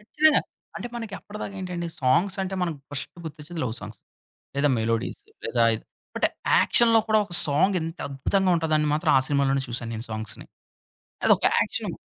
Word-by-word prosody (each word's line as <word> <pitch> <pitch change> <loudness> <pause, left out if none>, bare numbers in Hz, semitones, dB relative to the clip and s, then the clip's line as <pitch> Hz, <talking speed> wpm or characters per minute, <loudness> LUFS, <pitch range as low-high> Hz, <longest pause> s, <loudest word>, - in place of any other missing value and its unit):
ఖచ్చితంగా. 305 +8 +3 0.4
అంటే 240 - -5
మనకి 225 -4 -5
అప్పటిదాకా 205 -1 -7
ఏంటండి 180 -2 -4
సాంగ్స్ 155 +9 +2
అంటే 190 0 -3
మనకి 165 -4 -2
ఫస్ట్ 145 - -4
గుర్తొచ్చేది 155 +2 -7
లవ్ 115 -2 -2
సాంగ్స్. 105 -1 -10 0.6
లేదా 145 +1 +3
మెలోడీస్, 115 0 -1 0.2
లేదా 120 - +1 0.5
బట్ - - +3 0.3
యాక్షన్‌లో 230 -1 +5
కూడా 215 0 +4
ఒక 190 - -13
సాంగ్ 180 +7 +2
ఇంత 165 +2 -5
అద్భుతంగా 185 +8 +1
ఉంటదని 155 -2 +1
మాత్రం 155 +1 +1
ఆ - - +3
సినిమాలోనే 140 -1 +2
చూశాను 120 -1 -4
నేను 115 +2 -6
సాంగ్స్‌ని. 110 -1 -5 0.8
అదొక - - +4
యాక్షను. - - -2
155 Hz, 155 wpm, -25 LUFS, 135-190 Hz, 0.8 s, యాక్షన్‌లో